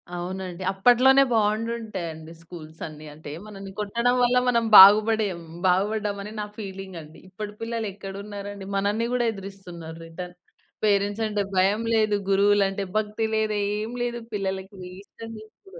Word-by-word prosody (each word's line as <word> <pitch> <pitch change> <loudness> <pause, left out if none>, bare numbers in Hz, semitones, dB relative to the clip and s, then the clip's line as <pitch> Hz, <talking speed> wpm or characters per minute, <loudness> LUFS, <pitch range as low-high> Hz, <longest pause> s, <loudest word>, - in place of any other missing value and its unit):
అవునండి. 185 0 -5
అప్పట్లోనే 250 +7 +5
బాగుండుంటాయండి, 210 -7 -2
స్కూల్స్ 165 -2 -12
అన్నీ. 155 0 -11
అంటే 150 0 -11 0.2
మనల్ని 195 -2 -9
కొట్టడం 235 +4 +1
వల్ల 245 +1 +3
మనం 235 -2 +2
బాగుపడే, 215 +2 +8
హ్మ్, 165 -1 -12
బాగుపడ్డాం 205 +3 +1
అని 210 - -8
నా - - -3
ఫీలింగ్ 195 -3 -7
అండి. 155 0 -14
ఇప్పటి 205 +2 -7
పిల్లలు 225 -1 -3
ఎక్కడ 195 -1 -8
ఉన్నారండి. 200 -1 -7
మనల్ని 205 +4 0
కూడా 245 -1 +1
ఎదిరిస్తున్నారు 185 -5 -9
రిటర్న్. 180 +2 -8 0.5
పేరెంట్స్ 205 +1 +1
అంటే 210 -1 -1
భయం 195 +4 +3
లేదు, 215 -2 +2
గురువులంటే 200 0 +3
భక్తి 215 +1 -1
లేదు, 215 -1 0 0.2
ఏం 215 +2 -4
లేదు 240 0 -3
పిల్లలకి 195 0 -4 0.2
ఇష్టం 225 +2 -11
ఇప్పుడు. 385 - -17
205 Hz, 140 wpm, -25 LUFS, 190-220 Hz, 0.5 s, బాగుపడే